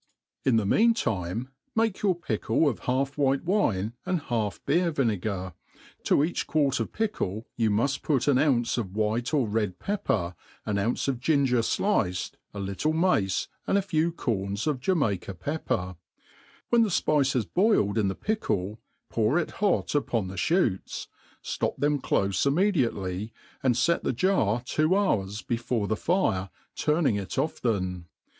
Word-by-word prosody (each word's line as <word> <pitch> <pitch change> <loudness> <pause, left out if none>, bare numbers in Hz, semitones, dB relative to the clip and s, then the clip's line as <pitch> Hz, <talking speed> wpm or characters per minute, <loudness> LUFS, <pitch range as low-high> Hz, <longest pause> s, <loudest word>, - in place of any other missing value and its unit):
In 130 -3 +3
the 110 -2 +2
mean 230 - +4
time, 110 - -2 0.3
make 225 -3 +1
your 195 -3 +3
pickle 115 -2 0
of 130 - 0
half 135 +3 0
white 135 -1 +2
wine 115 - +1
and 185 -2 0
half 115 -8 -2
beer^viAcgar 110 - 0 0.2
:* - - -25
to - - +4
eact^ 155 +5 0
quart 145 -5 +2
of 115 - -2
pickle 120 - -2
^ou 110 -1 +3
muft 120 +6 +1
put 140 -5 0
an 135 -3 +4
ounce 125 -5 +2
of 95 -4 -5
white 110 +3 0
or 140 -7 +2
red. 105 -4 -1
pepper, 105 - -1 0.3
an 100 -1 0
ounce 115 +7 0
of 130 -3 0
ginger 135 -3 +2
fliced, 90 - 0 0.2
a - - -10
lie 100 0 -3
tie 150 +10 0
mace, 155 - +1 0.2
and - - +3
a - - +3
fewc 165 -3 0
coch» 100 - -2
of 150 -4 0
Jamaica 115 - 0
pepper. 115 - -2 0.7
When 235 -1 +5
^ - - +3
fpice 150 -7 +2
has 120 -4 +1
boiled 170 - +2
in 105 - +2
the 95 - -1
pickle, 105 - -2 0.3
pour 115 +6 +1
it 175 - -1
hot 205 -3 +1
upon* 115 -9 0
t^e - - -7
ihootd, 115 - 0 0.4
Aop - - -2
them 145 0 +1
clofe 95 -5 +1
immediately, 115 - 0 0.3
^nd 125 -3 +3
fet 170 0 +1
the - - 0
jar 120 - +1
two 155 +7 +2
hours 105 - 0
before 115 -2 -1
the 110 - 0
fire, 110 - 0 0.3
turning 150 -8 +2
it 100 +4 -5
often. 95 - -1
125 Hz, 160 wpm, -27 LUFS, 100-155 Hz, 0.7 s, When